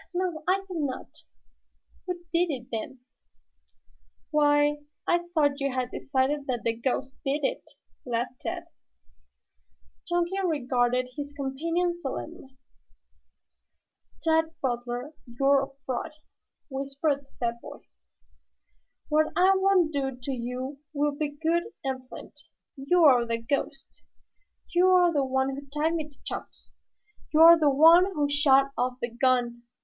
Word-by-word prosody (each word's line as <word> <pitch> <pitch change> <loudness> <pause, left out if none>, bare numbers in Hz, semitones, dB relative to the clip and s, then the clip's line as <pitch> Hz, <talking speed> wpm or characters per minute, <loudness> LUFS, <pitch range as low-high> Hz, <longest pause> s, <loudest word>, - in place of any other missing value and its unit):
"No, 350 -4 -2
I 390 +1 +2
think 360 -3 -5
not." 275 0 -4 0.9
"Who 360 - -1 0.2
did 345 +1 +2
it, 250 -5 -5
then?" 235 +3 -5 1.3
"Why, 295 -1 +3 0.3
I 345 0 +1
thought 290 -4 +2
you 275 -1 -1
had 255 -1 -2
decided 275 +2 -1
that 245 -3 -2
the 230 - +1
ghost 260 +3 -2
did 285 +2 -1
it?" - - -1 0.4
laughed 245 +1 -3
Tad. 345 -1 -4 1.4
Chunky 350 +2 0
regarded 255 -6 +1
his 290 -1 -6
companion 330 +6 -1
solemnly. 275 -3 -7 1.7
"Tad 320 0 +2
Butler, 245 +2 -3
you're 275 +3 +3
a 270 - -3 0.2
fraud," 260 +4 -3 0.6
whispered 275 +2 -1
the 270 - -32
fat 235 -1 -2
boy. - - -10 1.3
"What 310 0 +3
I 365 +3 +5
won't 380 -4 +3
do 270 -2 -2
to 255 +2 -5
you 255 +2 -5
will 290 0 0
be 295 0 -2
good 325 +4 0 0.2
and 260 -2 -4
plenty. - - -12 0.3
You're 280 -3 +4
the 230 0 0
ghost. 275 +3 -4 0.7
You're 360 -1 +5
the 285 -2 +2
one 265 0 0
who 280 0 -9
tied 300 +4 -1
me 310 -2 -3
to 285 - -25
Chops. - - -8 0.6
You're 330 +2 +8
the 300 -2 +4
one 325 +6 +7
who 295 -3 +1
shot 275 -2 +4
off 250 +1 -1
the 240 - -3
gun. 240 -1 +1
280 Hz, 130 wpm, -27 LUFS, 260-320 Hz, 1.7 s, You're